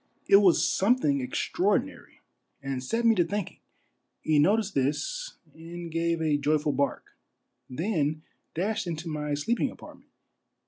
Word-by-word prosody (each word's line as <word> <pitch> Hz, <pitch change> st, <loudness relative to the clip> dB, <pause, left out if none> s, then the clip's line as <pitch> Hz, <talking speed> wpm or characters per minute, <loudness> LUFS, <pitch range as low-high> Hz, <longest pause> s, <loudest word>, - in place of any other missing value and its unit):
It 200 Hz, -, +8 dB
was 195 Hz, -4 st, +4 dB
something 190 Hz, -, +2 dB
extraordinary, 125 Hz, -, -2 dB, 0.4 s
and 135 Hz, -2 st, -4 dB
set 230 Hz, -, -1 dB
me 230 Hz, -, +6 dB
to 180 Hz, -, +3 dB
thinking. 200 Hz, +2 st, -4 dB, 0.6 s
He 155 Hz, -2 st, +3 dB
noticed 205 Hz, +6 st, +2 dB
this -, -, -2 dB, 0.2 s
and 170 Hz, +1 st, -9 dB
gave 165 Hz, 0 st, 0 dB
a 150 Hz, -2 st, +2 dB
joyful 150 Hz, +1 st, +1 dB
bark, 140 Hz, +1 st, -2 dB, 0.6 s
then 155 Hz, 0 st, -1 dB, 0.3 s
dashed 195 Hz, +3 st, -1 dB
into 170 Hz, 0 st, -4 dB
my 150 Hz, -2 st, -2 dB
sleep 225 Hz, +12 st, -1 dB
ing -, -, +1 dB
apartment. -, -, -14 dB
165 Hz, 135 wpm, -27 LUFS, 145-200 Hz, 0.6 s, It